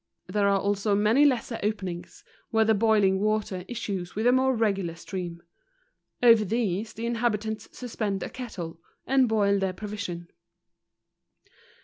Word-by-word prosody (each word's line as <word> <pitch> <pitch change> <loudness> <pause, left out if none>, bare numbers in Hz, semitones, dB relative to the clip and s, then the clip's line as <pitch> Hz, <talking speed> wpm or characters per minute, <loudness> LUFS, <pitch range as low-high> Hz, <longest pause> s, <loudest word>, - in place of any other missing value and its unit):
There 205 -1 +1
are 200 0 +3
also 200 +1 +1
many 215 +8 +4
lesser 245 -4 +1
openings, 190 -5 -4 0.3
where 220 -1 +3
the 220 - +4
boiling 205 -3 +3
water 210 -3 -1
issues 195 -7 -4
with 220 +3 -1
a 245 - +6
more 260 0 +3
regular 195 -7 0
stream. 170 -1 -6 0.8
Over 230 -3 +7
these 215 0 -1
the 230 - -5
inhabitants 220 -2 -1
suspend 215 -6 -3
a - - -4
kettle, 180 -10 -7 0.3
and 265 -2 +3
boil 200 -2 +2
their 190 -1 -1
provision. 195 -4 -6
210 Hz, 135 wpm, -27 LUFS, 195-225 Hz, 0.8 s, Over